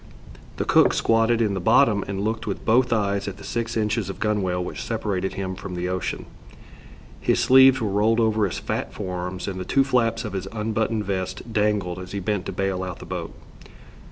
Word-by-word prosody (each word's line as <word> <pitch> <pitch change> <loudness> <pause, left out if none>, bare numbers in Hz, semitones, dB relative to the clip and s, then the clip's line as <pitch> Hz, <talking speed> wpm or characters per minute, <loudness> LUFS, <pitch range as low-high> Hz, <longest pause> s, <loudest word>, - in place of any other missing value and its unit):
The - - -1
cook - - +4
squatted 115 +1 +3
in 105 -2 0
the 95 - -2
bottom 110 0 +4
and 100 0 -3
looked 110 +2 -2
with - - -4
both 125 +3 +3
eyes 100 -3 0
at 100 -1 -5
the 100 - -12
six 115 +2 -3
inches 105 -2 0
of 95 - -6
gunwale 100 -4 0
which - - -6
separated 100 -5 -2
him 95 -1 -3
from 95 0 -7
the 90 +1 -2
ocean. 90 -1 -3 0.9
His - - +1
sleeves 130 0 +6
were 110 - -1
rolled 110 +3 +2
over 110 -2 +2
his 90 - -5
fat - - -3
forearms, 90 -2 -4
and 95 -2 -4
the - - -3
two 135 +8 +2
flaps 125 -3 +1
of 105 - -5
his 95 -1 -4
unbuttoned 110 0 -1
vest 95 +4 -4
dangled 105 -4 0
as 90 0 -9
he 100 - -2
bent 100 0 -2
to - - -3
bail 95 -1 -1
out 90 -2 -5
the - - -10
boat. - - -5
105 Hz, 205 wpm, -24 LUFS, 95-115 Hz, 0.9 s, sleeves